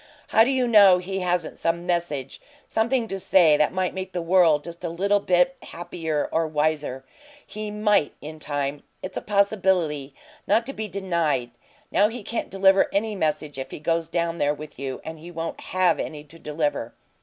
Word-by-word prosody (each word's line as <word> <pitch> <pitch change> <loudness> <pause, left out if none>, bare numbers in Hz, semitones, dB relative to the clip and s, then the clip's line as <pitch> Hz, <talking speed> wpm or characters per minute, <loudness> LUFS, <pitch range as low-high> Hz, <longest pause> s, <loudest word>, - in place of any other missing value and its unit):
How 225 - +6
do 245 - +1
you 260 -2 +1
know 200 -5 +7
he 190 +2 -4
hasn't 180 -2 -1
some 170 +1 -1
message 170 -7 -2 0.2
something 235 +1 0
to 195 -2 -4
say 175 -5 +5
that 150 0 +2
might 185 -1 -1
make 190 0 -6
the 175 - -2
world 165 -4 +4
just 170 +1 -8
a 170 - -2
little 200 +5 +1
bit 185 +7 +2
happier 165 -3 -3
or 165 0 +1
wiser? 150 -3 -1 0.4
He 215 0 -6
MIGHT 210 -6 +1
in 155 +2 -9
time 145 -1 -3 0.2
it's 185 - -6
a - - -2
possibility 190 -8 +1 0.3
not 230 - +3
to 275 - -5
be 220 -3 -4
denied. 170 -10 -1 0.4
Now 205 - +4
he 225 0 -7
can't 235 - -4
deliver 195 0 +4
any 210 +1 -1
message 150 -5 -2
if 130 0 -5
he - - -7
goes 165 +1 0
down 170 0 -2
there 145 +1 +1
with 150 0 -11
you, 135 -2 -5
and 160 0 -7
he 170 +3 -10
won't 165 -1 -5
HAVE 185 -1 +1
any 150 -2 -5
to 155 +3 -16
deliver. 150 -6 -2
170 Hz, 190 wpm, -24 LUFS, 150-195 Hz, 0.4 s, know